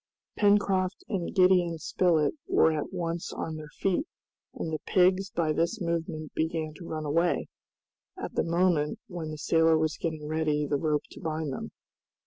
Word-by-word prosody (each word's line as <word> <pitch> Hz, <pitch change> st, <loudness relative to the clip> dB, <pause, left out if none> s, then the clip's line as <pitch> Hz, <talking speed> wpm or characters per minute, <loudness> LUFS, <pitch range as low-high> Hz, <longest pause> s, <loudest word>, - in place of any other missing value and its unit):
Pencroft 200 Hz, -2 st, +2 dB
and 190 Hz, -6 st, -2 dB
Gideon 180 Hz, -3 st, +4 dB
Spilett 160 Hz, -1 st, +2 dB
were 160 Hz, -, +4 dB
at 155 Hz, -2 st, -3 dB
once 170 Hz, -2 st, -3 dB
on 160 Hz, -, -4 dB
their 155 Hz, -1 st, -8 dB
feet, 195 Hz, -, +1 dB, 0.5 s
and 160 Hz, -, -4 dB
the 155 Hz, -, -1 dB
pigs 190 Hz, +1 st, +3 dB
by 160 Hz, -3 st, 0 dB
this 170 Hz, +8 st, 0 dB
movement 165 Hz, -3 st, -3 dB
began 160 Hz, -1 st, -1 dB
to 170 Hz, -, -9 dB
run 155 Hz, -1 st, -4 dB
away, 165 Hz, +4 st, +1 dB, 0.7 s
at -, -, -5 dB
the -, -, +1 dB
moment 170 Hz, -3 st, +2 dB
when 170 Hz, -4 st, -6 dB
the 155 Hz, -, -6 dB
sailor 160 Hz, +1 st, +3 dB
was 155 Hz, 0 st, 0 dB
getting 155 Hz, -2 st, -3 dB
ready 150 Hz, -1 st, 0 dB
the 145 Hz, 0 st, 0 dB
rope 150 Hz, 0 st, 0 dB
to -, -, -11 dB
bind 155 Hz, -3 st, -2 dB
them. -, -, -5 dB
165 Hz, 165 wpm, -28 LUFS, 155-180 Hz, 0.7 s, Gideon